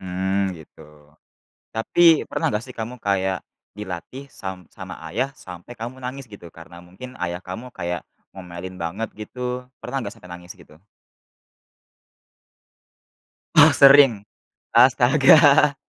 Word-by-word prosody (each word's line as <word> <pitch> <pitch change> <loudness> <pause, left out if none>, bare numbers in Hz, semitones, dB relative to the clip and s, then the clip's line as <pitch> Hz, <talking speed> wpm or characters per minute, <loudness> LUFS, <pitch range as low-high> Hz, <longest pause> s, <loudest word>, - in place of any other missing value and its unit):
Mmm 95 +1 -2
gitu. 80 - -18 0.9
Tapi 160 +8 +4
pernah - - -2
gak 105 - -1
sih 130 - -13
kamu 115 +2 -6
kayak 95 -2 -1 0.3
dilatih 105 +8 -8
sam 95 -6 -9
sama 95 -1 -9 0.2
ayah 135 - -2
sampai 90 0 -12
kamu 120 +3 -8
menangis 130 -1 -8
gitu 100 -4 -12
karena 85 +1 -13
mungkin 95 +9 -12
ayah 90 0 -4
kamu 115 +8 -9
kayak 85 -1 -5 0.2
ngomelin 90 0 -9
banget 95 +7 -4
gitu, 125 +3 -6 0.2
pernah 135 - -4
gak - - -7
sampai 90 - -16
nangis 90 0 -10
gitu? 75 - -19 2.8
Ah - - +8
sering. 135 -7 +6 0.5
Astaga. - - +5
100 Hz, 120 wpm, -22 LUFS, 90-125 Hz, 2.8 s, Ah